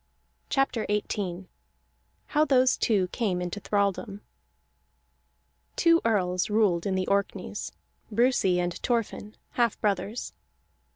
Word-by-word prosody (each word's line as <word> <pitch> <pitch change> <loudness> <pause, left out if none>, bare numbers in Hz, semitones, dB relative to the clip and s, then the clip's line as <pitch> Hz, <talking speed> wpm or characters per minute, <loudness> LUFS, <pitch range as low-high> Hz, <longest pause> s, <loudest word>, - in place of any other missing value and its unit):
CHAPTER 270 -5 0
XVIII 195 -3 -2 0.8
HOW 300 0 +2
THOSE 260 -4 +4
TWO 200 -5 +2
CAME 195 -6 -1
INTO 180 +3 -4
THRALDOM 200 0 -1 1.5
Two 335 -1 +4
earls 185 -5 +1
ruled 205 -5 +2
in 190 - 0
the 185 0 0
Orkneys: 200 +1 -2 0.4
Brusi 225 -5 +3
and 175 0 -1
Thorfinn, 230 -2 -2 0.2
half 235 -3 +1
brothers. 210 +3 -2
205 Hz, 105 wpm, -27 LUFS, 185-235 Hz, 1.5 s, THOSE